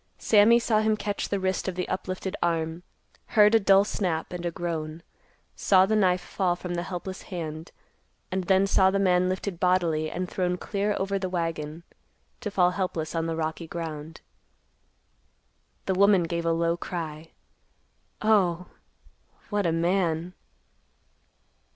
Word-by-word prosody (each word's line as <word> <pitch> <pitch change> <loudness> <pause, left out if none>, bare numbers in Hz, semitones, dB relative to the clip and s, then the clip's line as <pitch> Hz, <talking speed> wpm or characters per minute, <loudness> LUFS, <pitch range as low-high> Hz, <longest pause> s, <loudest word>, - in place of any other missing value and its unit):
Sammy 220 +2 +5
saw 230 -2 +2
him 215 0 +2
catch 205 -1 -3
the 200 - 0
wrist 190 0 -1
of 185 - -2
the 180 - -2
uplifted 185 +1 -4
arm, 165 0 -1 0.6
heard 210 +1 +7
a 225 - +6
dull 195 -1 +5
snap 180 -5 -2
and 175 -1 -5
a - - +1
groan, 165 -1 -4 0.5
saw 190 -1 +4
the 215 +3 +1
knife 185 -3 +3
fall 180 -3 -1
from 180 0 -6
the 175 - -1
helpless 185 +2 -6
hand, 160 -3 -6 0.6
and 185 0 -2
then 190 +1 +4
saw 190 -1 +4
the 195 - 0
man 185 -2 +3
lifted 185 -1 -3
bodily 170 -4 +1
and 180 +3 -3
thrown 180 0 -1
clear 200 +2 -1
over 195 +1 -1
the 190 -1 -3
wagon, 165 -2 -3 0.6
to 225 - -4
fall 180 -3 +3
helpless 180 -4 -3
on 165 -1 -1
the 165 - -2
rocky 160 +1 -3
ground. 160 -1 -6 1.6
The 190 - +1
woman 195 -1 +4
gave 170 0 -2
a - - +3
low 165 +1 +1
cry, 165 -3 -6 0.9
"Oh, 185 -5 +2 0.8
_what 205 -3 +1
a - - +2
man!" 170 0 0
180 Hz, 150 wpm, -26 LUFS, 165-195 Hz, 1.6 s, heard